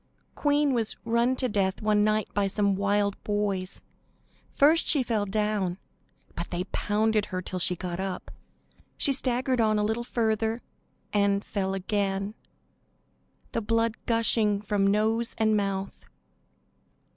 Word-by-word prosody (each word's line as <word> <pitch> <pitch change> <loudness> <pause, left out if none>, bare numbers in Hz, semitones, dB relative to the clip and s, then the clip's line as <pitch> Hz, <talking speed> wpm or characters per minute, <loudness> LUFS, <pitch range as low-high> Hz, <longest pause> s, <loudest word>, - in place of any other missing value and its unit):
"Queen 290 -1 +2
was 230 -3 -1
run 235 +2 +2
to 255 0 0
death 195 -4 0
one 210 -1 +2
night 215 0 +1
by 200 -1 +1
some 200 0 +1
wild 200 0 0
boys. 200 -3 -2 0.7
First 310 +4 +4
she 285 -4 +4
fell 220 -4 -1
down, 205 -3 0 0.6
but 170 - -5
they 175 0 -2
pounded 215 0 +1
her 185 -3 -3
till 185 0 -5
she 180 +1 +2
got 175 0 -5
up; 190 -1 -4 0.7
she 280 - +2
staggered 255 -1 0
on 215 -1 +3
a 210 - +1
little 220 +3 -1
further 225 -1 -1 0.5
and 200 -1 +2
fell 195 -1 -2
again, 195 +1 -1 1.2
the 230 - -1
blood 230 +1 +1
gushing 225 -3 +2
from 205 -1 +1
nose 220 +3 +1
and 220 -1 +3
mouth. 195 -1 -2
210 Hz, 135 wpm, -27 LUFS, 195-230 Hz, 1.2 s, First